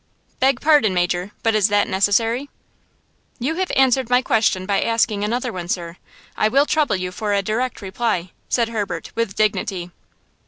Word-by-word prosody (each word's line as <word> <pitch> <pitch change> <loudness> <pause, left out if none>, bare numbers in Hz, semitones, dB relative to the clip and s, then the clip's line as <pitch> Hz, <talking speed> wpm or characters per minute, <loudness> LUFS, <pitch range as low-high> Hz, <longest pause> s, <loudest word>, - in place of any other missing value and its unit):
"Beg 265 -1 +2
pardon, 290 -11 +4
Major, 175 +1 0
but 225 - +2
is 215 -2 +3
that 205 -1 +2
necessary?" 225 +7 +1 0.9
"You 270 +6 -1
have 375 -1 -1
answered 265 -2 +3
my 250 +1 +3
question 215 -5 +1
by 200 0 +1
asking 225 -2 +1
another 240 +3 -2
one, 180 -2 -5
sir. 175 -1 -4 0.4
I - - +2
will 275 +6 +3
trouble 305 -5 +1
you 185 -1 -3
for 205 +2 -2
a 200 - +1
direct 225 +3 -2
reply," 190 -2 -2 0.2
said 235 -2 +1
Herbert 215 -3 -4
with 230 -4 -2
dignity. 190 -4 -1
215 Hz, 165 wpm, -21 LUFS, 190-245 Hz, 0.9 s, pardon